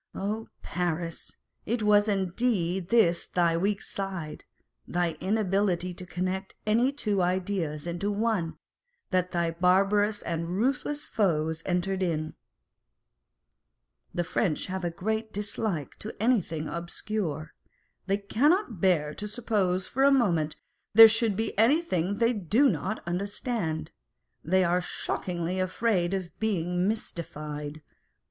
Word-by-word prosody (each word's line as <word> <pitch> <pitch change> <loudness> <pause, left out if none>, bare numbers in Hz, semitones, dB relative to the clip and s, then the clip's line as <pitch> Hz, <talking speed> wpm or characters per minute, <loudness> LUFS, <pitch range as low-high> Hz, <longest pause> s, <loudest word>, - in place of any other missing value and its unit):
Oh, 215 +3 -3 0.2
Paris! 170 -1 -3 0.3
it 230 0 0
was 210 0 +5
indeed 190 -2 0
on - - -24
this 175 -8 +3
thy 170 -2 +2
weak 195 +4 0
side 190 -6 -5 0.4
(thy 175 -1 0
inability 190 -2 +1
to 180 +1 -8
connect 185 +2 -3
any 230 +5 +3
two 210 -9 0
ideas 180 -4 -1
into 175 +4 -2
one) 205 -5 0 0.5
that 180 -1 +1
thy 170 -1 0
barbarous 195 +5 +2
and 165 0 -3
ruthless 275 +5 0
foes 160 -6 0
entered 190 +1 0
in! 155 -4 -1 1.8
The 175 - -1
French 170 -1 0
have 190 0 -4
a 175 - 0
great 220 +6 -2
dislike 205 -6 -2
to 215 - -7
anything 190 -9 +1
obscure. 170 -2 -4 0.5
They 195 +1 +2
cannot 235 - +1
bear 155 -6 +2
to 210 - -5
suppose 205 -5 0
for 270 - 0
a 280 - +7
moment 170 - +2 0.4
there 225 0 +12
should 225 -1 +2
be 225 +3 -2
anything 220 - +2
they 235 +1 +3
do 220 - +3
not 190 - -3
understand: 190 - -2 0.5
they 185 +4 +3
are 180 +1 +2
shockingly 175 0 -3
afraid 185 -1 +1
of 185 -3 -4
being 180 -4 0
mystified. 150 -7 -5
190 Hz, 125 wpm, -28 LUFS, 170-215 Hz, 1.8 s, there